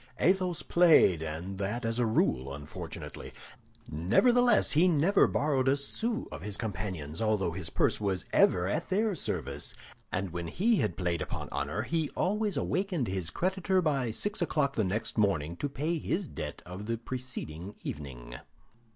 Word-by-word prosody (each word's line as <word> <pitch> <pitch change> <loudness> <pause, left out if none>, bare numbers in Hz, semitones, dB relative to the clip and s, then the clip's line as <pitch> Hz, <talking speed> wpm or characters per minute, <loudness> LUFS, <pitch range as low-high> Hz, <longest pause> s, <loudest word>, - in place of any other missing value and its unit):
Athos 185 -1 +2
played, 160 - +5
and 85 +5 -5
that 105 +5 -2
as 115 +1 -1
a 120 - +3
rule 70 - +1
unfortunately. 70 +1 -8 0.6
Nevertheless, 240 - +4
he 165 +5 +5
never 175 +4 +4
borrowed 135 -3 +1
a 135 +1 +4
sou 220 - -2
of - - -7
his 105 0 -3
companions, 90 -7 -4
although 110 -5 +1
his 85 0 -5
purse - - +1
was 95 -4 -1
ever 90 0 +4
at 100 - -2
their 210 +2 +2
service; - - -3 0.4
and 95 -1 -2
when 85 0 -4
he 215 - +2
had - - 0
played 85 -3 -1
upon - - -4
honor, 110 - -2
he 160 +2 -1
always 210 +1 0
awakened 180 - -1
his 95 -4 -2
creditor 190 - +1
by 140 -8 +1
six 205 - -1
o'clock 150 -5 +1
the 110 - +1
next 110 +4 -1
morning 85 -6 +1
to 145 - -2
pay 155 +5 -1
the 180 +4 -1
debt - - -6
of 95 +4 -7
the 115 0 -1
preceding 110 -7 -6
evening. - - -7
115 Hz, 160 wpm, -30 LUFS, -, 0.6 s, played